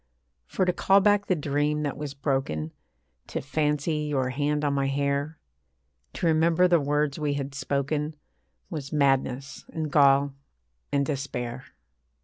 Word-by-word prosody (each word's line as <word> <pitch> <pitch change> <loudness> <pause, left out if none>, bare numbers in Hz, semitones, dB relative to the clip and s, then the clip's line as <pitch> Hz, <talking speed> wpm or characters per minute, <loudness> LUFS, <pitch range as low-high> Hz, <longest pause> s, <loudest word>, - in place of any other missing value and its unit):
For 185 - 0
to 180 - +1
call 195 +2 +4
back 205 0 +3
the 185 - +2
dream 150 0 0
that 145 - -2
was 145 -1 -6
broken, 135 - -2 0.5
To - - -3
fancy 150 +2 0
your 145 -4 -1
hand 150 +2 0
on 145 - +1
my 140 -1 +1
hair, 140 +2 -1 0.8
To - - -3
remember 165 +2 +4
the 175 -2 +4
words 145 +1 0
we 145 -2 0
had 140 -1 -4
spoken, 145 +2 -2 0.6
Was 145 -4 -5
madness, 135 -2 0
and 155 -2 -3
gall, 140 -1 +5 0.6
and 140 0 +2
despair. 135 -3 -4
145 Hz, 140 wpm, -26 LUFS, 140-155 Hz, 0.8 s, gall